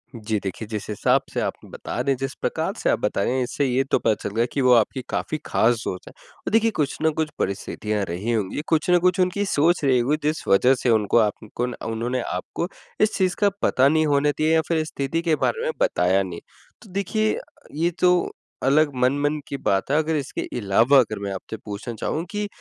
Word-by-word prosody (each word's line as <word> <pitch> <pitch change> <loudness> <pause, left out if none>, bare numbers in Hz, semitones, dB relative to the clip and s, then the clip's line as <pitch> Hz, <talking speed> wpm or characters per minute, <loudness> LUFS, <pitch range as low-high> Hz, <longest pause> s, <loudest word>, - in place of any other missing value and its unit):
जी 110 -1 -2
देखिए, 100 +3 -5
जिस 105 -2 -4
हिसाब 105 - +2
से - - -1
आप - - -1
बता - - -6
रहे - - -1
हैं, 135 - 0
जिस 135 +1 -3
प्रकार - - -1
से - - 0
आप - - +2
बता - - -1
रहे 125 - 0
हैं 130 - +1
इससे 140 +3 -1
ये 130 +1 +2
तो 135 - +1
पता 110 - +2
चल 100 - -4
गया 115 +1 +3
कि 140 - 0
वो 125 -1 +5
आपकी 120 +3 +2
काफ़ी 155 - -2
ख़ास 120 +2 +3
दोस्त 90 - -5
है - - -9 0.4
और - - 0
देखिए 225 0 +3
कुछ 145 -2 0
ना 160 - +4
कुछ 155 - 0
परिस्थितियाँ 105 +1 -2
रही 100 +8 -2
होंगी, 110 +4 -1
कुछ 160 +1 +1
ना 180 - +6
कुछ 180 +1 +2
उनकी 185 +3 +1
सोच 165 -1 +2
रही 130 -3 +4
होगी 140 +6 +1
जिस 155 - -1
वजह 125 +7 +5
से 125 - +2
उनको 110 -1 +3
आपको 110 +2 -1
ना 125 - -6
उन्होंने 120 +3 -2
आपको 170 - -4 0.3
इस 215 - +3
चीज़ 185 -2 +1
का 205 -1 +4
पता 130 +1 +4
नहीं 155 +1 +3
होने 145 0 +3
दिया 155 +1 +2
या 160 - +4
फिर 160 -1 +1
स्थिति 155 +2 -2
के 165 -2 +2
बारे 460 - 0
में 485 - 0
बताया 90 +2 +2
नहीं। 90 -3 -6 0.4
तो 210 - -15
देखिए 215 +2 0 0.4
ये 170 +3 +1
तो 180 -1 +3 0.3
अलग 145 +3 +4
मन-मन 145 +3 +1
की 140 - -4
बात 95 +1 0
है, 150 - +3
अगर 160 0 +1
इसके 140 -2 -3 0.2
अलावा 115 +6 +4
अगर 110 -4 0
मैं 100 - -3
आपसे 110 +4 -7
पूछना 105 +3 -5
चाहूँ 160 - -2
कि 210 0 -2
135 Hz, 225 wpm, -23 LUFS, 110-160 Hz, 0.4 s, ना